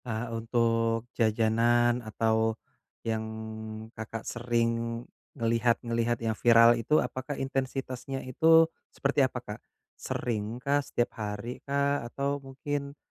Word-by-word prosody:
Eee, 115 Hz, 0 st, -2 dB
untuk 115 Hz, 0 st, +1 dB
jajanan 115 Hz, +2 st, +3 dB
atau 110 Hz, 0 st, +1 dB, 0.5 s
yang 110 Hz, -1 st, 0 dB, 0.7 s
Kakak 110 Hz, 0 st, -6 dB
sering 120 Hz, -1 st, 0 dB, 0.7 s
ngelihat-ngelihat 115 Hz, 0 st, +1 dB
yang 110 Hz, -, +1 dB
viral 115 Hz, +1 st, +6 dB
itu 120 Hz, +6 st, +2 dB
apakah 130 Hz, +1 st, -2 dB
intensitasnya 135 Hz, -1 st, -3 dB
itu 160 Hz, +5 st, +6 dB, 0.2 s
seperti 140 Hz, +1 st, +1 dB
apa, 130 Hz, -1 st, +1 dB
Kak? 105 Hz, +2 st, -6 dB, 0.4 s
Seringkah, 120 Hz, +5 st, -1 dB
setiap 120 Hz, -3 st, -1 dB
harikah, 130 Hz, +7 st, -1 dB
atau 140 Hz, +2 st, -2 dB
mungkin, 140 Hz, +1 st, -5 dB
120 Hz, 100 wpm, -29 LUFS, 115-135 Hz, 0.7 s, viral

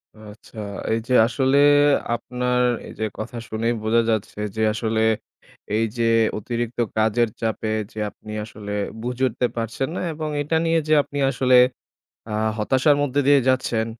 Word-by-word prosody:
আচ্ছা। 110 Hz, +1 st, -14 dB, 0.4 s
এই 115 Hz, -, +1 dB
যে 125 Hz, -, 0 dB
আসলে 130 Hz, +3 st, +1 dB, 0.6 s
আপনার 125 Hz, +1 st, -1 dB, 0.3 s
এই -, -, -9 dB
যে 110 Hz, -, 0 dB
কথা 120 Hz, +2 st, -6 dB
শুনেই 115 Hz, +2 st, -1 dB
বোঝা 115 Hz, +2 st, +3 dB
যাচ্ছে 110 Hz, -1 st, -2 dB, 0.2 s
যে 110 Hz, -, -2 dB
আসলে 110 Hz, 0 st, -1 dB, 0.8 s
এই 115 Hz, -, +2 dB
যে 115 Hz, -, +1 dB, 0.3 s
অতিরিক্ত 120 Hz, +2 st, -4 dB, 0.2 s
কাজের 110 Hz, +1 st, +2 dB
চাপে 110 Hz, -1 st, -2 dB, 0.2 s
যে 110 Hz, -, -8 dB
আপনি 105 Hz, +1 st, -13 dB
আসলে 105 Hz, -1 st, -8 dB, 0.3 s
বুঝে 125 Hz, +2 st, -3 dB
উঠতে 125 Hz, +1 st, -1 dB
পারছেন 115 Hz, +5 st, -3 dB
না, -, -, -3 dB
এবং 155 Hz, 0 st, -4 dB
এটা 160 Hz, +3 st, 0 dB
নিয়ে 165 Hz, 0 st, +3 dB
যে 155 Hz, -, +3 dB
আপনি 145 Hz, -, -6 dB
আসলে 130 Hz, -1 st, +4 dB, 0.7 s
আ -, -, -4 dB, 0.3 s
হতাশার 130 Hz, +6 st, +3 dB
মধ্য 140 Hz, -1 st, -3 dB
দিয়ে 140 Hz, -1 st, +6 dB
যাচ্ছেন 120 Hz, -3 st, +1 dB
120 Hz, 155 wpm, -22 LUFS, 110-130 Hz, 0.8 s, দিয়ে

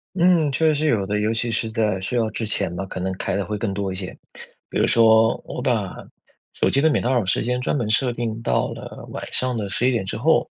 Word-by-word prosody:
嗯， 170 Hz, -4 st, +4 dB
确 150 Hz, +4 st, +1 dB
实 155 Hz, -, +4 dB
是 155 Hz, +2 st, +1 dB
有 100 Hz, -7 st, +1 dB
的。 105 Hz, +1 st, -1 dB
尤 105 Hz, +1 st, +1 dB
其 115 Hz, +1 st, -1 dB
是 110 Hz, +1 st, -1 dB
在 110 Hz, -4 st, 0 dB
睡 120 Hz, +6 st, 0 dB
觉 110 Hz, -1 st, +1 dB
之 115 Hz, -, -3 dB
前 100 Hz, -4 st, -1 dB
吧， 95 Hz, -, -3 dB
可 95 Hz, -, -6 dB
能 95 Hz, +1 st, -2 dB
开 95 Hz, -, -2 dB
得 100 Hz, -, -1 dB
会 105 Hz, -, -3 dB
更 105 Hz, -1 st, -2 dB
多 95 Hz, -1 st, -2 dB
一 -, -, -5 dB
些。 95 Hz, -1 st, -5 dB, 0.5 s
比 -, -, -10 dB
如 -, -, +3 dB
说 115 Hz, -1 st, +5 dB
我 -, -, -5 dB
把， -, -, 0 dB, 0.6 s
手 -, -, +1 dB
机 140 Hz, -, +2 dB
的 160 Hz, +1 st, +4 dB
免 -, -, +2 dB
打 125 Hz, -, +1 dB
扰 120 Hz, -5 st, +2 dB
时 95 Hz, -, +1 dB
间 125 Hz, +2 st, -1 dB
专 125 Hz, -, 0 dB
门 120 Hz, -6 st, -1 dB
设 125 Hz, +2 st, +2 dB
定 115 Hz, -1 st, -4 dB
到 -, -, +1 dB
了 -, -, -9 dB
晚 -, -, -6 dB
上 125 Hz, -1 st, 0 dB
的 105 Hz, -3 st, -3 dB
11 125 Hz, +6 st, +1 dB
点 115 Hz, -5 st, -1 dB
之 95 Hz, -, -3 dB
后。 155 Hz, +8 st, +2 dB
115 Hz, 280 characters per minute, -22 LUFS, 100-125 Hz, 0.6 s, 说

